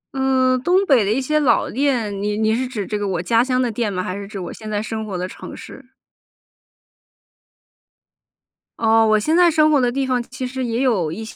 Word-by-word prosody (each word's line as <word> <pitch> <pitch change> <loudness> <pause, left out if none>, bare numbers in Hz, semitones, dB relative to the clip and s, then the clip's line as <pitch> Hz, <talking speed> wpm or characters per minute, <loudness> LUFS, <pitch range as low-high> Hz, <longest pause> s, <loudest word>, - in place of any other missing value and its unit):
嗯， 260 -1 +2
东 370 +7 +2
北 265 - +4
的 205 - 0
一 240 - +1
些 305 +3 0
老 285 -4 +2
店， 235 -7 -1
你 210 0 -2
你 220 0 +1
是 255 +2 -2
指 220 -6 -4
这 210 +1 -3
个 205 - -2
我 180 -3 -2
家 225 +6 +2
乡 255 0 0
的 250 -2 0
店 220 -1 -2
吗？ 185 -1 -3
还 185 - -4
是 200 0 -7
指 200 0 -8
我 175 - -6
现 215 - -9
在 210 -1 -1
生 220 0 -4
活 200 -4 -5
的 180 +1 -3
城 - - -10
市？ 270 - -11 3.0
哦， 225 0 +4
我 215 0 +3
现 315 +11 +1
在 350 -1 +5
生 310 -1 +4
活 290 - +4
的 245 -2 +1
地 270 +2 -1
方 255 -1 0
其 255 +1 -6
实 260 +1 -4
也 235 +1 -2
有 200 - +1
一 220 +6 -6
些 220 - -10
230 Hz, 245 characters per minute, -20 LUFS, 210-260 Hz, 3.0 s, 在